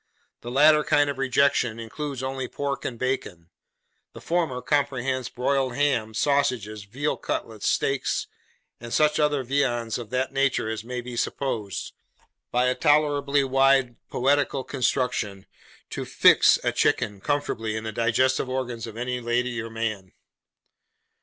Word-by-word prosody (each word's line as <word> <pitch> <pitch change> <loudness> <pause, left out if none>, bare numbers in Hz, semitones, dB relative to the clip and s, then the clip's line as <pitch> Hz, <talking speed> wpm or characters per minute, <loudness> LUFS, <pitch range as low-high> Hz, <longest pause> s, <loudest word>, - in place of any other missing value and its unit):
The 120 - -7
latter 150 +4 +5
kind 145 -1 +3
of 135 - -9
rejection 130 -3 +2
includes 135 +3 -5
only 130 -1 -3
pork 140 +2 -4
and 120 - -3
bacon. 100 -10 -3 0.6
The - - -10
former 165 -7 -1
comprehends 130 -3 -1
broiled 130 0 0
ham, 120 -6 0
sausages, 125 -7 0
veal 135 +9 -2
cutlets, 110 -2 -4
steaks, 135 -1 0 0.5
and 120 0 -9
such 150 +3 +3
other 150 -2 +2
viands 120 -4 0
of 115 -3 -8
that 130 +2 -1
nature 135 -4 +1
as 110 -1 -4
may 125 +1 -5
be 120 0 -8
supposed, 115 -5 -3 0.6
by 125 +1 +1
a 125 - +2
tolerably 145 0 +2
wide 135 -2 +3
poetical 140 +1 +1
construction, 125 -7 -1 0.5
'to - - -4
fix' - - +5
a - - +1
chicken 105 -2 0
comfortably 115 -6 -2
in 110 - -4
the 110 - -4
digestive 120 +4 +1
organs 125 -3 -3
of 110 0 -9
any 125 +1 -2
lady 120 0 -1
or 115 - -7
gentleman. 110 -4 -4
125 Hz, 140 wpm, -25 LUFS, 115-140 Hz, 0.6 s, latter